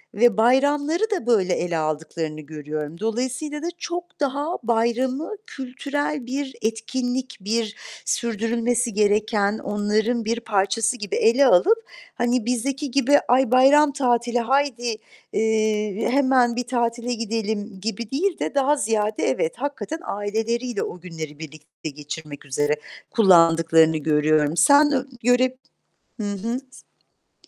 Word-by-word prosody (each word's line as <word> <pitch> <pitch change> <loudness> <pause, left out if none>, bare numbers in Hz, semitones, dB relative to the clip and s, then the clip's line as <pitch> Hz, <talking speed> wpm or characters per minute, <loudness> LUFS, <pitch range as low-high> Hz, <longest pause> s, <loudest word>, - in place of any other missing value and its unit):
ve 230 -1 +4
bayramları 285 - +2
da 370 - -1
böyle 190 -6 +3
ele 175 -2 -1
aldıklarını 155 0 -3
görüyorum. 150 +1 -6
Dolayısıyla 255 +7 -3
da 335 - -3
çok 350 +1 -6
daha 290 +4 -1
bayramı 240 - 0 0.2
kültürel 280 - -4
bir 265 +1 -4
etkinlik, 245 +3 -2
bir 220 +1 -1 0.3
sürdürülmesi 235 0 0
gereken 210 0 +1
onların 215 +3 0
bir 230 +2 -1
parçası 225 +2 0
gibi 205 -4 -4
ele 250 +5 +4
alıp, 445 - +4 0.3
hani, 240 -1 0
bizdeki 270 +3 -2
gibi 280 +2 +4
"Ay 255 -1 +3
bayram 280 +3 +6
tatili, 240 -3 +1
haydi, 245 -2 0 0.4
eee, 215 -1 0
hemen 260 -3 +3
bir 250 - -1
tatile 240 0 -1
gidelim." 220 -3 -3
gibi 225 +1 -4
değil 340 +6 0
de - - -3
daha 280 +1 +3
ziyade, 215 -4 -1
evet, 145 +5 0
hakikaten 285 +4 -4
aileleriyle 225 +3 -2
o 180 - -6
günleri 160 -4 -8
birlikte 155 0 -9
geçirmek 150 0 -8
üzere 145 +2 0 0.4
kullandıklarını 165 -5 +5
görüyorum. 155 +1 +2
Sen 290 +1 +6
ö 265 -2 0 0.2
göre 255 +1 +3 0.6
hı 205 -1 -2
hı. 230 +5 -3 0.7
S - - -30
230 Hz, 125 wpm, -23 LUFS, 200-260 Hz, 0.7 s, bayram